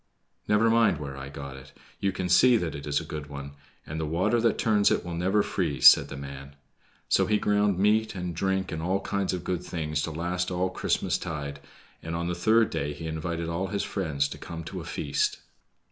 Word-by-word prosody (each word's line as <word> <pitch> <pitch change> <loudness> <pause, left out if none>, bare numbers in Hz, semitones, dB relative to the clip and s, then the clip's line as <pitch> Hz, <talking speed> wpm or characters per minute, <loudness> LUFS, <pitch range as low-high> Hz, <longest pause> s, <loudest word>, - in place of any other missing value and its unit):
"Never 105 +2 +4
mind 115 -7 +4
where 70 -2 -6
I 70 0 -7
got 70 -1 -8
it. 65 - -14 0.3
You 100 - +1
can 90 -1 -3
see 120 +7 +6
that 85 -7 -2
it 70 +1 -7
is 70 0 +1
a 85 - -7
good 75 -2 -6
one, 70 0 -7 0.3
and 80 +2 -5
the 80 - -1
water 95 +9 +1
that 115 -2 +2
turns 105 -2 +3
it - - 0
will 90 - -5
never 95 +5 +2
freeze," 75 -9 +3
said - - +8
the 70 - -7
man. 70 0 -9 0.5
So - - +3
he 105 - +3
ground 105 -2 +2
meat 110 +2 +2
and 90 -2 -4
drink 95 +1 -1
and 80 - -3
all 95 +4 0
kinds 100 -1 -1
of 90 -2 -4
good 90 -1 -2
things 75 -4 -2
to 85 - -3
last 90 +3 -2
all 90 +1 -1
Christmastide, 70 -6 -2 0.4
and 80 +1 -4
on 85 0 -2
the 90 - -1
third 110 +6 +3
day 75 +1 -2
he 80 +3 -8
invited 80 +1 -3
all 85 +3 -2
his 100 +1 -2
friends 75 -8 -1
to - - -8
come 85 -1 -7
to 90 +2 -6
a - - -9
feast. 75 -3 -1
85 Hz, 220 wpm, -27 LUFS, 75-95 Hz, 0.5 s, said